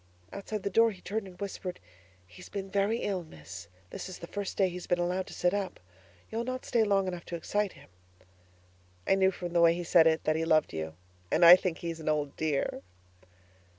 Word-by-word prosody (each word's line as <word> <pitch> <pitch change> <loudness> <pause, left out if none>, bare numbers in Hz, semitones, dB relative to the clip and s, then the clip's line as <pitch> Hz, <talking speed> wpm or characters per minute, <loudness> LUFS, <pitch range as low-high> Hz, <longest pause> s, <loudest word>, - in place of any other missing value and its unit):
Outside 200 0 -5
the 200 - -2
door 230 +4 +5
he 195 -4 -9
turned 200 +2 -4
and 180 -1 -14
whispered, 190 -2 -5 0.5
'He's 90 -1 -13
been 195 -1 -5
very 205 +3 +1
ill, 195 -3 -1
Miss. 90 - -11 0.2
This - - -6
is 185 - -7
the - - -8
first 200 +2 -5
day 195 - +4
he's 180 0 -7
been 175 - +2
allowed 180 +2 -1
to - - -9
sit 180 +1 +1
up. 200 -2 -3 0.5
You'll 230 +1 -2
not 255 +1 -4
stay 235 -3 +2
long 200 -2 +2
enough 180 -2 -4
to 175 - -5
excite 205 +4 -1
him?' - - -18 1.1
I - - +3
knew 190 0 +4
from 175 -2 -6
the 170 - +4
way 170 0 +6
he 175 - -4
said 165 -1 +5
it 160 0 +2
that 155 - +1
he 160 - 0
loved 160 - +2
you 80 0 -4 0.4
and 170 - +5
I 170 +1 +12
think 180 -2 -2
he's 165 -1 -5
an 155 - -2
old 150 -2 -1
dear! 155 -3 -1
180 Hz, 220 wpm, -30 LUFS, 165-200 Hz, 1.1 s, I